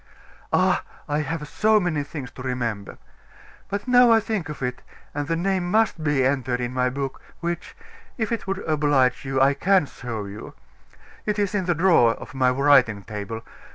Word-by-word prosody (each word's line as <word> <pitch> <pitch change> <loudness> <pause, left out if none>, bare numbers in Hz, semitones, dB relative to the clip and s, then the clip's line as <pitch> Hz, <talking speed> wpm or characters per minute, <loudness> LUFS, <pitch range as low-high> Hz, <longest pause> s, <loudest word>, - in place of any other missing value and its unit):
"Ah! - - +3 0.3
I 145 0 0
have 150 0 -3
so 215 +6 +3
many 175 -6 0
things 140 -4 -7
to - - -11
remember. 120 -6 -3 0.7
But 200 +4 -4
now 245 -1 +6
I 225 - +6
think 215 -7 -3
of 150 -2 -6
it, 125 0 -3 0.3
and 145 0 -3
the 165 - 0
name 180 +1 0
must 215 -5 +2
be 145 -4 +2
entered 130 -2 0
in 120 0 -3
my 125 0 +1
book, 135 +1 -4 0.2
which, 170 0 -4 0.4
if 220 -2 -2
it 230 -4 -3
would 195 -1 -3
oblige 145 -5 +2
you, 135 0 -1
I 135 +1 +5
can 185 +4 +3
show 115 -6 -6
you. 100 +1 -9 0.7
It 210 0 0
is 205 -1 0
in 200 -3 0
the 175 -1 +1
drawer 160 -9 +4
of 130 - -11
my 130 -2 +3
writing 125 -6 +4
table. 110 +1 -6
145 Hz, 185 wpm, -24 LUFS, 125-185 Hz, 0.7 s, now